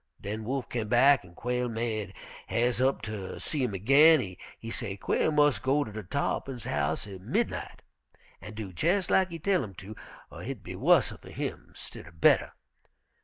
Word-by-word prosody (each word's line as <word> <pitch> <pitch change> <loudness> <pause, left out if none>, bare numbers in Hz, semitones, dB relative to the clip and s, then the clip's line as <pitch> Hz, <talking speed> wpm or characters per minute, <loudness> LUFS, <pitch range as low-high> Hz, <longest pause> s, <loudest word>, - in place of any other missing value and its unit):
Den 110 +2 -5
Wolf 130 +1 -2
came 115 -3 -3
back 130 +4 +5
an' 85 -1 -16
Quail 125 +2 -1
made 110 -4 -3 0.3
has'e 120 +1 +1
up 135 - -2
ter 105 -3 -5
see 150 - -3
him 110 -6 -1
ag'in. 135 - +5 0.2
He 115 - -7
say 100 -5 -3
Quail 130 - +1
mus' 145 -6 +4
go 135 +3 +2
ter 110 -2 -6
Tarr'pin's 130 +3 -2
house 75 +2 -1
at 95 -3 -9
midnight - - -2 0.6
an' 105 - -9
do 105 -4 -6
jes' 180 - +1
lak 190 -1 +4
he 170 - -6
tell 185 +2 +1
'im 100 -3 -8
to, 100 +4 -9 0.4
er - - -9
hit - - -6
be - - -7
wusser - - +3
fer - - -13
him, - - -5
stidder 85 - -9
better. - - +4
115 Hz, 175 wpm, -29 LUFS, 100-140 Hz, 0.6 s, back